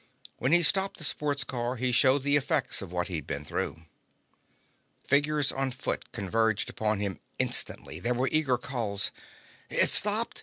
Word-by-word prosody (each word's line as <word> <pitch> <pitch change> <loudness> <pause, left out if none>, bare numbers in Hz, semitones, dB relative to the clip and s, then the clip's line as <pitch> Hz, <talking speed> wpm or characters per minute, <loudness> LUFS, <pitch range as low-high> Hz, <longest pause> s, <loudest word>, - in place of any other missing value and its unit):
When 125 - -1
he 175 +1 +6
stopped 190 +4 +3
the - - -6
sports 145 -2 0
car 125 -1 -3
he 125 +1 0
showed 130 +2 +4
the 145 0 +3
effects 145 -3 0
of 95 -3 -8
what 90 +1 -2
he'd 80 -7 -5
been 70 +1 -5
through. 80 +2 -4 1.2
Figures 145 0 +2
on 135 0 -2
foot 130 - -4
converged 110 +2 0
upon 105 -2 -1
him 100 -4 -3 0.2
instantly. 80 - -2
There 120 +7 -1
were 130 +2 0
eager 145 -5 +2
calls. 115 -6 -2 0.6
"It's - - +3
stopped? 210 +3 +4
125 Hz, 160 wpm, -28 LUFS, 105-145 Hz, 1.2 s, he